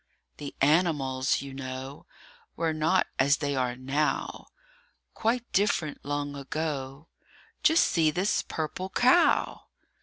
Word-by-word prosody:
THE 145 -2 -7
animals, 140 -4 +2
you 135 -1 -8
know, 130 +1 -7 0.5
Were 165 -1 0
not 160 +4 +2
as 140 +3 +4
they 145 -2 -2
are 125 -2 -1
now; 135 +4 -2 0.7
Quite 235 +2 -1
different 185 -7 0
long 145 0 -3
ago 140 0 -4 0.5
Just 320 +2 +5
see 160 -2 +2
this 185 +6 0
purple 165 +4 -4
cow! 255 - +3
145 Hz, 115 wpm, -28 LUFS, 135-170 Hz, 0.7 s, Just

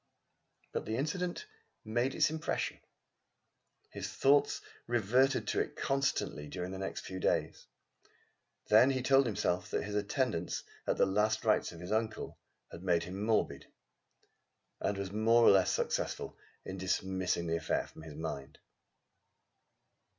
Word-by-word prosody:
But - - -3
the 110 - -2
incident 175 - -2 0.4
made 120 +5 0
its - - +3
impression. 160 -1 -2 1.1
His - - -5
thoughts 145 +1 +3 0.3
reverted 120 +4 +2
to - - +1
it - - -2
constantly 135 - -1
during 90 +4 -5
the 95 - -5
next 95 - -4
few 95 0 -6
days. - - 0 1.0
Then 110 +5 +7
he 130 -2 0
told 135 0 +5
himself 90 -4 -1
that - - -1
his 105 - -5
attendance 105 - -1 0.2
at - - +1
the - - +5
last 105 +3 +1
rites 105 -1 +2
of 85 - -11
his 90 +3 -6
uncle 110 0 -2 0.3
had 85 - -9
made 85 -2 +2
him 95 +3 -6
morbid, 110 0 0 1.1
and 100 0 -1
was 100 -1 -4
more 115 +3 +4
or - - +8
less 95 -2 +4
successful - - -2 0.3
in 95 0 -6
dismissing 95 -1 -1
the 85 0 0
affair 80 - -1
from - - -14
his 80 -2 -9
mind. 75 -4 -5
105 Hz, 145 wpm, -33 LUFS, 90-125 Hz, 1.1 s, or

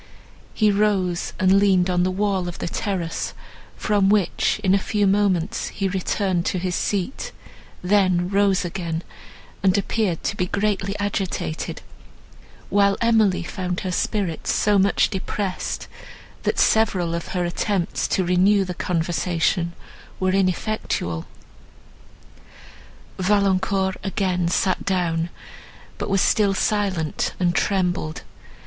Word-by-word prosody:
He 215 -2 +4
rose, 195 -4 +1
and 185 +1 +5
leaned 190 -3 +3
on 180 -1 +1
the 180 - +2
wall 190 -1 0
of 175 - -6
the - - -4
terrace, 175 -3 -3 0.4
from 205 -3 +2
which, 205 0 +2
in 190 -1 +3
a 200 - +4
few 205 +1 0
moments, 195 -3 +1
he 195 - -2
returned 190 -1 0
to - - 0
his 180 0 -2
seat, 210 - -2 0.5
then 185 -2 +3
rose 195 -1 +2
again, 170 -2 -3 0.6
and 190 +1 +3
appeared 200 -4 -1
to - - -1
be 180 - -1
greatly 200 0 -1
agitated; 195 - -3 0.9
while 200 0 +3
Emily 220 -6 +3
found 180 0 -3
her 185 - -3
spirits 185 -3 -1
so 205 -1 +3
much 200 +3 +3
depressed, 195 -1 -3 0.5
that - - -1
several 190 -6 +2
of 170 0 -3
her 175 - +1
attempts 175 +1 -1
to 185 - 0
renew 190 +3 +3
the 180 - -4
conversation 170 0 0 0.5
were 185 0 +1
ineffectual. 185 - -1 1.9
Valancourt 190 -1 +1
again 185 -3 0
sat 185 +2 +1
down, 170 -3 0 0.7
but - - -3
was 195 -1 +2
still 205 -3 +3
silent, 190 -7 0
and 175 -1 +2
trembled. 180 -4 0
190 Hz, 125 wpm, -23 LUFS, 180-200 Hz, 1.9 s, and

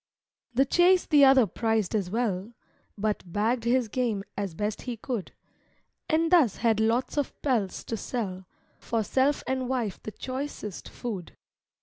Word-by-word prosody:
The 270 +3 +4
chase 355 +5 +4
the 295 -3 +5
other 265 -3 +6
prized 220 0 0
as 200 -5 0
well; 215 -1 -1 0.4
But 210 0 -1
bagged 220 +7 -1
his 245 0 +2
game 220 -3 -1
as 195 -4 -3
best 210 +3 -2
he 245 -2 -5
could, 225 -3 -4 0.8
And 325 0 +2
thus 305 - +5
had 225 -2 +2
lots 230 +6 +1
of 285 - -3
pelts 230 -9 0
to 230 - -3
sell 190 -5 -4 0.3
For 225 -2 -1
self 270 +6 +1
and 260 -1 -1
wife 240 -7 -2
the 215 - -6
choicest 255 -5 -6
food. 205 -8 -6
230 Hz, 150 wpm, -27 LUFS, 205-260 Hz, 0.8 s, other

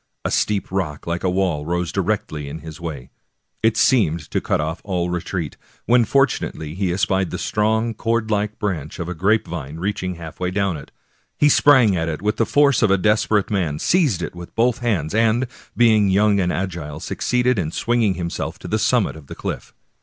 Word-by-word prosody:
A - - 0
steep 105 -3 0
rock 85 -6 -3
like 85 +1 -3
a 95 - +2
wall 90 -5 0
rose 85 +2 -2
directly 90 -7 -2
in 80 +2 -7
his 80 +2 -10
way; 75 -7 -6 0.5
it 110 0 +2
seemed 85 - +2
to - - 0
cut - - 0
off 80 +3 -3
all 90 -3 -1
retreat, 90 -2 -3 0.3
when 120 0 +4
fortunately 120 - 0
he 95 0 -1
espied 95 0 +1
the - - -4
strong, 110 +2 0
cord 115 0 -1
like 105 0 -1
branch 85 -8 -3
of 85 - -4
a 90 - -3
grape 100 +6 +1
vine 75 -3 -6
reaching 95 0 -2
half 80 -1 -10
way 90 -1 -1
down 100 -1 0
it. 70 - -9 0.5
He 150 - +4
sprang 130 -9 +5
at 80 -1 -1
it 75 - -3
with 105 +1 0
the 115 - +1
force 145 -2 +4
of 115 - +4
a 95 - +4
desperate 105 +1 +2
man, 85 -8 0
seized 140 - +2
it - - -4
with 85 0 -10
both 120 +1 +2
hands, 100 -11 -1
and, 115 +3 +2 0.3
being 110 -4 +5
young 100 +1 +3
and 90 -2 +1
agile, 85 -6 -4
succeeded 125 +3 0
in 80 -4 -1
swinging 110 +2 +1
himself 85 -1 -4
to - - -9
the - - 0
summit - - +2
of 75 -3 -13
the - - -8
cliff. - - -5
95 Hz, 200 wpm, -21 LUFS, 85-110 Hz, 0.5 s, sprang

